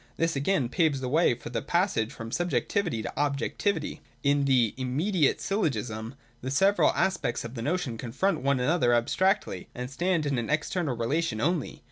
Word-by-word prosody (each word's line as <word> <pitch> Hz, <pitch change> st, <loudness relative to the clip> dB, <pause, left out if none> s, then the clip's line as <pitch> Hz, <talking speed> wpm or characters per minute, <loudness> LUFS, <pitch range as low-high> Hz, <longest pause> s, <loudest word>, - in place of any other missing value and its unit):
This 165 Hz, -1 st, +1 dB
again 140 Hz, -1 st, +1 dB
paves 150 Hz, +1 st, +1 dB
the 130 Hz, -, -3 dB
way 150 Hz, -1 st, +3 dB
for 120 Hz, -, -9 dB
the 120 Hz, -, -2 dB
passage 170 Hz, -, 0 dB
from 115 Hz, 0 st, -8 dB
subjectivity 175 Hz, -, 0 dB
to -, -, -5 dB
objectivity. 145 Hz, +8 st, -1 dB, 0.2 s
182.] 140 Hz, -, +4 dB
In 145 Hz, -1 st, +2 dB
the 125 Hz, -5 st, +3 dB
'immediate' 145 Hz, +6 st, +1 dB
Syllogism 120 Hz, -, -2 dB, 0.3 s
the 130 Hz, -, -4 dB
several 195 Hz, +9 st, +4 dB
as 190 Hz, -1 st, +2 dB
pects 120 Hz, -3 st, -2 dB
of 115 Hz, -, -7 dB
the 115 Hz, -, -5 dB
notion 145 Hz, -5 st, -2 dB
confront 135 Hz, +12 st, -1 dB
one 140 Hz, 0 st, +2 dB
another 125 Hz, -3 st, +3 dB
abstractly, 190 Hz, -, +1 dB
and 125 Hz, +1 st, -5 dB
stand 175 Hz, +2 st, 0 dB
in 140 Hz, -4 st, 0 dB
an 115 Hz, -, -4 dB
external 155 Hz, -2 st, -1 dB
relation 140 Hz, +2 st, 0 dB
only. 165 Hz, +3 st, -1 dB
140 Hz, 175 wpm, -28 LUFS, 120-175 Hz, 0.3 s, 182